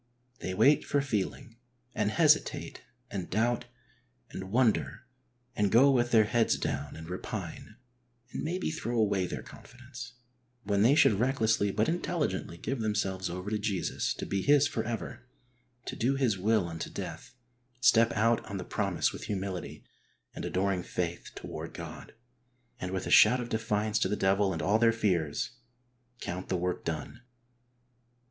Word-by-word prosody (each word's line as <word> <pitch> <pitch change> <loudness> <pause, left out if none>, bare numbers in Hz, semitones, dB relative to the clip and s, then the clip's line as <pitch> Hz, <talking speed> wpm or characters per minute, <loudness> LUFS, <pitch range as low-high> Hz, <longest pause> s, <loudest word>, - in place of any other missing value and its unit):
They 95 - -4
wait 135 +9 +5
for 145 - +1
feeling, 120 -1 -3 0.4
and 105 -2 0
hesitate 155 +1 +2 0.3
and 95 -3 -4
doubt 115 +4 +1 0.7
and 95 0 -6
wonder 125 +1 +1 0.5
and 105 -2 +1
go 135 +5 +6
with 120 -2 +2
their 110 -2 +6
heads 115 +2 +2
down 70 +1 -3
and 80 0 -9
repine, 90 +3 -6 0.6
and - - -4
maybe 175 +2 -2
throw 120 -7 -3
away 100 -4 +2
their - - -5
confidence, 125 0 -11 0.5
when 100 0 +1
they 120 +7 +6
should 105 -9 +5
recklessly 115 -5 +2
but 105 +3 +1
intelligently 160 - -2
give 135 +8 -3
themselves 95 -4 -1
over 90 +4 -5
to 105 - 0
Jesus 100 -3 -1
to - - -5
be 100 - -1
His 145 +2 +5
for 115 -5 -2
ever, 120 +2 -5 0.6
to - - -5
do 130 +4 +1
His 130 -6 +2
will 100 0 +1
unto 80 -1 -5
death, - - -7 0.4
step 115 -2 +5
out 115 +2 +2
on 100 - -4
the 90 - -4
promise - - 0
with - - -7
humility 95 -4 -4 0.5
and - - -6
adoring 95 0 0
faith 85 -1 -4
toward - - -7
God, - - -9 0.6
and 90 - -4
with 95 0 -3
a - - -3
shout 125 +4 +7
of 120 -1 -4
defiance 110 -1 0
to 95 - +2
the 105 - 0
devil 95 0 +2
and 85 - -3
all 105 +3 +3
their 115 0 +5
fears, 90 -10 0 0.7
count 90 -2 -5
the 95 - +1
v.ork 90 +1 -2
done. 80 +9 -5
110 Hz, 160 wpm, -30 LUFS, 95-120 Hz, 0.7 s, shout